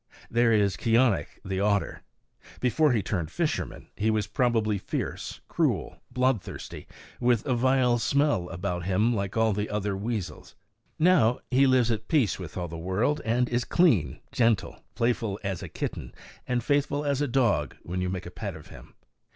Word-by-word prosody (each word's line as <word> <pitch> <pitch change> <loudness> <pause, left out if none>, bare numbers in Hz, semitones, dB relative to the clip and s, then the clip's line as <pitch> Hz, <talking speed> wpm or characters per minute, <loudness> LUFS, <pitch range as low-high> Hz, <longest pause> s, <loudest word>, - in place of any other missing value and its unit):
There 120 0 +3
is 100 -4 +2
Keeonekh 115 - +3 0.2
the 95 0 -2
otter. 100 0 0 0.6
Before 130 +5 +3
he 110 -5 +1
turned 90 -6 -2
fisherman - - -3
he 105 +2 0
was 110 -2 +1
probably 110 -2 +1
fierce, - - -4
cruel, - - -1
bloodthirsty, 125 -4 -2 0.3
with 120 -2 +2
a 135 - +1
vile 125 -1 +3
smell 140 -9 +1
about 90 -1 -3
him, 105 +6 +2
like 100 0 -3
all 110 -1 +3
the 105 +1 -2
other 105 -1 -1
weasels. 105 -1 -5 0.4
Now 155 -9 +4
he 135 +2 +5
lives 125 -2 +3
at 110 -1 -3
peace 130 - +2
with 90 -2 -8
all 90 -1 -2
the 85 0 -7
world 105 - 0
and 120 +2 +1
is 120 0 0
clean, 115 - +2
gentle, 115 -4 +1
playful 115 -4 0
as 95 -3 -3
a - - -7
kitten - - -5 0.3
and 125 -2 0
faithful 145 +1 +1
as 140 -1 0
a 145 - +1
dog 115 - +1
when 90 +2 -3
you 90 - -1
make 95 0 -4
a 85 - -8
pet 100 -2 -5
of 80 - -12
him. - - -14
110 Hz, 170 wpm, -27 LUFS, 95-125 Hz, 0.6 s, he